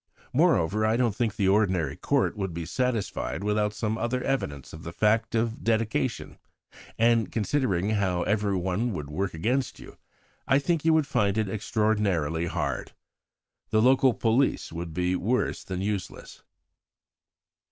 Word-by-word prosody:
Moreover, 95 +6 +3
I 110 +1 +2
don't 120 -5 +1
think 115 -3 -1
the 100 - +1
ordinary 95 -8 +2
Court - - 0
would 95 -5 -4
be 85 -1 -4
satisfied 115 -1 -2
without 105 0 +1
some 110 +1 -2
other 125 +2 -1
evidence 70 - -3
of 80 - -9
the 85 - -7
fact 110 +6 +1
of 115 0 -1
dedication; 115 +2 -1 0.6
and 115 -3 +3
considering 105 -4 0
how 95 -4 +1
everyone 100 +1 0
would 75 -4 -6
work 95 +3 -2
against 125 +10 -1
you, - - -13 0.5
I 135 0 +4
think 160 +2 0
you 160 0 +4
would 155 -2 +3
find 105 -6 +1
it 110 -2 +1
extraordinarily 100 -7 0
hard. - - -3 0.8
The 110 - +2
local 130 +1 +4
police 120 +4 +1
would 85 0 -5
be 90 +2 0
worse 115 +8 -1
than 95 -1 -4
useless." 100 -2 -5
105 Hz, 145 wpm, -27 LUFS, 90-115 Hz, 0.8 s, I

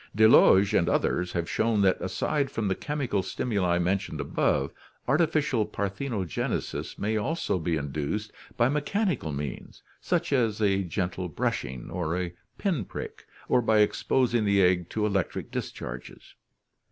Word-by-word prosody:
Delage 105 -3 +6
and - - +3
others 90 0 0
have 85 -1 -1
shown 110 -2 +1
that 95 -1 +3
aside 135 +9 -1
from 115 -6 -2
the 95 - +2
chemical 135 -6 -2
stimuli 95 -2 0
mentioned 90 +2 -1
above, - - 0 0.3
artificial 145 -4 +2
parthenogenesis 100 - -3
may 110 +2 0
also 110 - -1
be 80 0 0
induced 75 +9 -3 0.3
by 120 -1 +4
mechanical 150 - 0
means 70 -1 -6 0.2
such 170 -3 0
as 115 -5 +1
a 100 -2 +2
gentle 90 0 -3
brushing 65 -4 -3
or 85 -1 -2
a 90 -1 -3 0.2
pin 175 - 0
prick, - - -8 0.2
or 125 - +3
by 110 -2 +3
exposing 120 +2 +2
the 100 -1 +3
egg 90 -1 +2
to 105 -1 -1
electric 100 -4 -1
discharges. 60 0 -7
100 Hz, 140 wpm, -27 LUFS, 90-120 Hz, 0.3 s, Delage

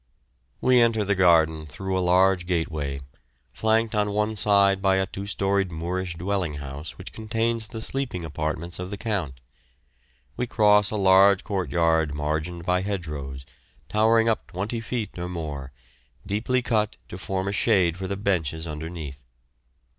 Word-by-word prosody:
We 125 -1 +5
enter 115 -3 +2
the 100 - +2
garden 80 -4 +3
through 95 +5 -4
a 95 - +1
large 90 0 +3
gateway, 80 -6 -2 0.5
flanked 110 - +1
on 105 -1 +1
one 105 +1 0
side 100 -1 +4
by 95 -1 +3
a 95 0 +2
two 95 +1 -7
storied 100 -1 0
Moorish 85 +2 -3
dwelling 90 -3 -2
house 70 +1 -7
which - - -10
contains 115 0 -1
the 110 -1 -6
sleeping 125 -12 -3
apartments 80 +3 -3
of 90 0 -5
the 105 - -5
Count. 95 - -3 1.0
We 125 0 -1
cross 105 -2 +4
a - - -3
large 95 -1 +5
court 95 -4 -2
yard 80 -3 +2
margined 75 +4 -3
by 90 0 +2
hedgerows, 75 -9 -5 0.4
towering 115 +1 +3
up 115 - 0
twenty 105 +6 -3
feet 115 -5 -4
or 90 +1 -4
more, 75 -6 -5 0.5
deeply 115 +6 0
cut 110 -3 0
to 90 - -8
form 95 0 -2
a - - 0
shade 90 -4 +3
for 95 0 -5
the 100 +1 -3
benches 85 -6 -1
underneath. 75 -3 -6
95 Hz, 155 wpm, -25 LUFS, 80-105 Hz, 1.0 s, We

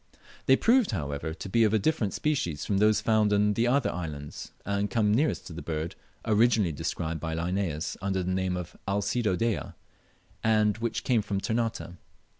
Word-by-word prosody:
They 130 - +7
proved, 235 - +3
however, 75 - -3
to 80 - -7
be 115 +4 +3
of 110 0 +3
a - - +5
different 105 -2 0
species 90 - -1
from 100 -2 +1
those 105 0 +4
found 110 -2 +3
in 105 0 +3
the 115 +3 +1
other 135 +2 +2
islands, 75 -5 -6
and 100 +1 0
come 105 -3 +2
nearest 150 +7 +1
to 85 - -8
the 85 - -6
bird 80 0 -3 0.3
originally 110 -4 +3
described 80 +2 -3
by 80 +1 -3
Linnaeus 85 -2 -2
under 95 -1 -1
the 90 +1 -1
name 95 -1 0
of 85 -1 -7
Alcedo 100 +1 0
dea, 115 +1 0 0.8
and 110 -1 +3
which 115 0 -2
came 120 -4 +2
from 100 -1 -2
Ternate. 115 -2 -2
100 Hz, 180 wpm, -28 LUFS, 85-115 Hz, 0.8 s, They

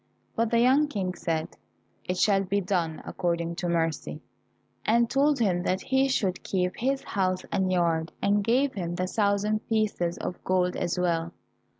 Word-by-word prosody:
But 230 0 +1
the 235 - +2
young 265 +5 +4
King 195 -9 -2
said, 160 -2 -2 0.6
"It 180 - -2
shall 195 0 +3
be 200 +2 0
done 175 -4 -1
according 170 -1 -2
to 175 - -2
mercy," 165 -3 -1 0.6
and 235 +2 +3
told 280 +4 +2
him 190 -6 +1
that 185 +1 -1
he 265 +1 +2
should 195 -8 0
keep 180 -1 -1
his 270 +3 0
house 185 -1 -1
and 190 -1 +1
yard, 165 -2 +1
and 205 0 +2
gave 255 +5 +2
him 175 -3 -3
the 180 +1 -1
thousand 205 +2 +1
pieces 205 -6 0
of 180 - -5
gold 180 -1 +1
as 175 - -2
well. 170 -1 0
185 Hz, 170 wpm, -27 LUFS, 175-220 Hz, 0.6 s, young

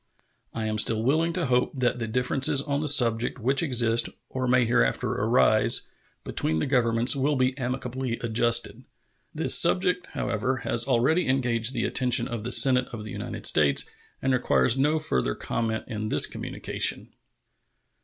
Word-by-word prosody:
I 110 -1 -5
am 110 0 -2
still 110 +1 0
willing 160 +7 +1
to 170 -1 -2
hope 125 -1 0
that 125 -1 -1
the 115 - -3
differences 125 +4 0
on 140 -1 -2
the 155 - -3
subject 120 -4 +2
which 130 +3 +1
exist, 120 -6 +1 0.2
or 130 -1 -3
may 125 0 +3
hereafter - - 0
arise, - - +2 0.3
between 80 - -2
the - - -1
Governments 120 -2 +1
will 140 +2 0
be 130 0 0
amicably 125 -1 -4
adjusted. 115 0 0 0.5
This - - +3
subject, 180 -1 +2
however, 125 +2 -2
has 120 +2 +1
already 140 +8 +1
engaged 125 -2 +1
the 115 - -1
attention 125 -2 +1
of 120 -5 -6
the 125 - -5
Senate 125 -1 +4
of 110 -3 -9
the 105 - -9
United - - -7
States, 75 -2 +3 0.4
and 135 0 +1
requires 125 -1 +2
no 145 +4 +1
further 65 - -1
comment 115 -1 -3
in 110 -1 -5
this - - +5
communication. - - -3
125 Hz, 160 wpm, -25 LUFS, 115-135 Hz, 0.5 s, this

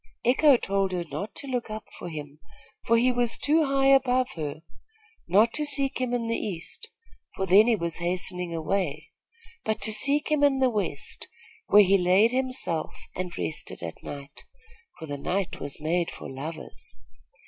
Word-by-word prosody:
Echo 265 +2 +6
told 195 -3 -1
her 175 -1 -1
not 200 +5 -6
to - - -6
look 250 -4 -3
up 215 0 -5 0.2
for 175 - -6
him, 150 -2 -8 0.5
for 230 - +5
he 250 +2 +4
was 240 -1 0
too 310 +2 +3
high 275 -1 +1
above 255 -1 +4
her, 155 -1 -5 0.6
not 210 +6 +4
to 300 - 0
seek 275 -2 -1
him 250 -1 0
in 245 -1 -1
the 230 - 0
east, 195 - -6 0.5
for 190 - -1
then 200 +4 +6
he 235 - +4
was 170 -4 -3
hastening 180 0 -3
away; 165 -2 -2 0.5
but 220 0 -1
to 220 - +2
seek 285 +7 +2
him 300 -1 +3
in 280 -2 +4
the 260 -1 +3
west, 180 -10 -3 0.4
where 210 0 +8
he 195 +1 +4
laid 185 +6 +4
himself 255 -11 -2 0.2
and 180 -1 -4
rested 85 0 -5
at 85 - -7
night, 140 -1 -9 0.5
for 160 - -7
the 145 -2 -5
night 185 +5 -2
was 140 0 -6
made 165 +3 0
for - - -9
lovers. 155 +5 -8
200 Hz, 175 wpm, -27 LUFS, 165-250 Hz, 0.6 s, where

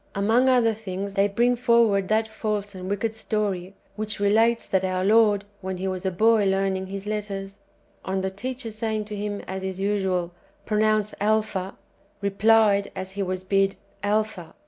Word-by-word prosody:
Among 225 +6 +3
other 240 -3 +4
things, 200 -2 -5
they 195 0 +3
bring 240 +5 +2
forward 235 -5 +3
that 220 +1 +2
false 210 -2 -3
and 185 0 -7
wicked 210 +2 -1
story 200 -4 -2 0.2
which 215 0 -2
relates 225 +3 +3
that 190 -1 0
our 185 0 0
Lord, 210 -1 +4 0.2
when 190 0 -4
He 190 +1 -3
was 185 0 -3
a - - 0
boy 220 +3 +3
learning 190 -1 0
His 195 +1 -6
letters, 200 -2 -4 0.4
on 190 0 -2
the 190 0 -2
teacher 245 +3 -5
saying 215 0 -2
to 210 0 -6
Him, 205 0 -3
as 190 0 -6
is 190 0 -4
usual, 190 -3 0 0.3
"Pronounce 215 -1 +1
Alpha," 210 -3 0 0.4
replied 200 0 +3
[as 190 0 -5
He 200 +1 -4
was 185 -1 -2
bid], 195 0 +2 0.3
"Alpha." 210 -4 -1
205 Hz, 170 wpm, -25 LUFS, 190-220 Hz, 0.4 s, other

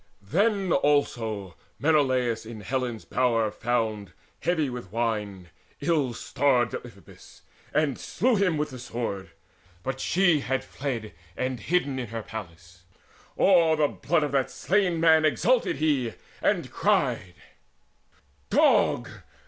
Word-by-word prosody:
Then 200 +1 +2
also 110 - 0 0.2
Menelaus 130 -6 +2
in 110 -1 -9
Helen's 125 -2 -3
bower 115 -4 +1
Found, 110 -3 -2 0.3
heavy 160 -4 +1
with 125 -7 -7
wine, 105 -6 -2 0.3
ill 145 -8 0
starred 125 -3 +1
Deiphobus, - - -11 0.3
And 145 -3 +1
slew 250 0 +1
him 190 -5 +2
with 150 -1 -2
the 130 - -8
sword: 115 -6 -4 0.5
but 135 0 -3
she 175 -2 +3
had 135 -1 -2
fled 130 -5 -5 0.2
And 130 -1 -2
hidden 145 - 0
her - - -2
in 115 - -9
the 115 -1 -4
palace. 90 -4 -9 0.6
O'er 170 -4 +5
the 150 -2 +2
blood 160 0 0
Of 145 - -2
that 135 -2 +1
slain 185 -3 +1
man 160 -1 +5
exulted 225 - +2
he, 140 -7 0 0.3
and - - 0
cried: 90 -1 0 1.1
"Dog! - - +3
130 Hz, 125 wpm, -26 LUFS, 115-155 Hz, 1.1 s, O'er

